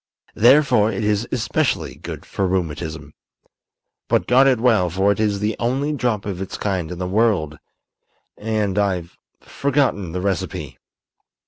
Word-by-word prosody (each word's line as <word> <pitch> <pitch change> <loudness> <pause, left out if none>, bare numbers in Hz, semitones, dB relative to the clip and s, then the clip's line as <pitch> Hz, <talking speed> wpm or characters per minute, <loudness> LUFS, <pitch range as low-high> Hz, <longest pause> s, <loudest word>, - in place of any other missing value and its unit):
Therefore 120 -3 +4
it 100 +1 -3
is 105 +2 0
especially 115 - -1
good - - -8
for 95 - -2
rheumatism. 80 -4 -3 1.0
But - - +2
guard 130 +2 +5
it 130 -4 +3
well, 110 -7 +3
for 95 +4 +2
it 100 - -2
is 105 -2 +1
the 105 0 0
only 135 +5 0
drop 120 -7 -1
of 95 -3 -4
its 95 - -5
kind 95 -5 -2
in 90 - -6
the 90 - -3
world, 90 -7 +1 0.8
and 105 -2 -1
I've 90 -4 -1 0.3
forgotten 135 - -1
the 90 - -3
recipe." 95 -3 -3
100 Hz, 145 wpm, -21 LUFS, 90-115 Hz, 1.0 s, guard